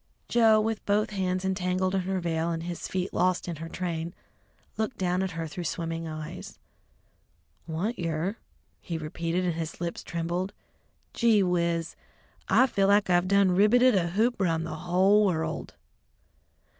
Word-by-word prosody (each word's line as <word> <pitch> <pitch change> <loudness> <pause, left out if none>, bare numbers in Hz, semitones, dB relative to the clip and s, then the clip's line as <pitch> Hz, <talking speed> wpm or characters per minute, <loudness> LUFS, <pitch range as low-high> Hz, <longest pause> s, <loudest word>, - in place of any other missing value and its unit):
Joe, 225 -2 +5
with 220 0 -1
both 210 +2 +2
hands 185 -2 -1
entangled 185 0 0
in 190 - +1
her 190 +1 -2
veil 165 -1 -1
and 165 -1 -3
his 175 0 -5
feet 185 0 -3
lost 180 0 +1
in 170 -3 -4
her 165 +2 -7
train, 170 -2 -4 0.6
looked 220 +2 -2
down 180 0 0
at 190 -2 -2
her 165 - -2
through 165 +3 -6
swimming 165 0 -3
eyes. 155 -1 -7 1.1
"Want 185 +9 -2
yer?" 170 +5 -2 0.4
he 170 - -5
repeated, 165 +3 -2
and 175 - +1
his 165 0 -5
lips 170 0 -3
trembled, 175 +3 -3 0.6
"gee 225 -4 +4
whiz! 170 -2 0 0.5
I 255 - +6
feel 200 -6 +1
like 200 -2 +3
I 175 0 +5
done 195 +1 +3
ribbeted 235 +7 +5
a 180 -4 +2
hoop 220 +5 +1
round 165 -3 +1
the 155 - -5
hull 190 +4 +3
world!" 165 -5 -2
180 Hz, 155 wpm, -27 LUFS, 165-200 Hz, 1.1 s, I